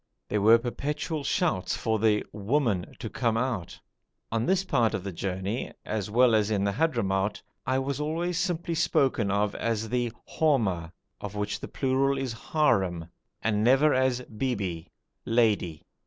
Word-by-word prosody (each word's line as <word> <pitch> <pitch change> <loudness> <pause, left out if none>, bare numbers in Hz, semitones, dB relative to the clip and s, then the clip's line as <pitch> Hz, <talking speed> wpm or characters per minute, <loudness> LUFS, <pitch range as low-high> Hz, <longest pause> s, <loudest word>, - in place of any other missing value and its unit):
There 105 - 0
were 110 +3 +7
perpetual 145 +5 -3
shouts 140 - 0
for 110 -1 0
the 105 -1 +2
'woman' 105 -2 0
to - - -5
come 115 0 0
out. 115 -8 -2 0.5
On 115 +1 0
this 190 0 +3
part 115 - +1
of 90 - -4
the 100 - -4
journey, 95 +6 -3
as 105 -2 -2
well 120 +2 +4
as 110 -1 +3
in 100 -2 +1
the 100 - +1
Hadhramout, 105 -9 0 0.3
I 130 - +2
was 135 +1 -2
always 165 +3 -1
simply 175 -2 -1
spoken 130 -9 +2
of 100 +1 +1
as 110 -1 -2
the 120 -1 0 0.3
Horma 105 - +2 0.3
(plur. 130 +7 -1 0.3
Harem) 95 - +2 0.3
and 105 -1 +1
never 135 +5 +5
as 130 -1 +2
Bibi 105 -9 -3 0.4
(lady). 110 -9 +1
115 Hz, 140 wpm, -27 LUFS, 100-135 Hz, 0.5 s, were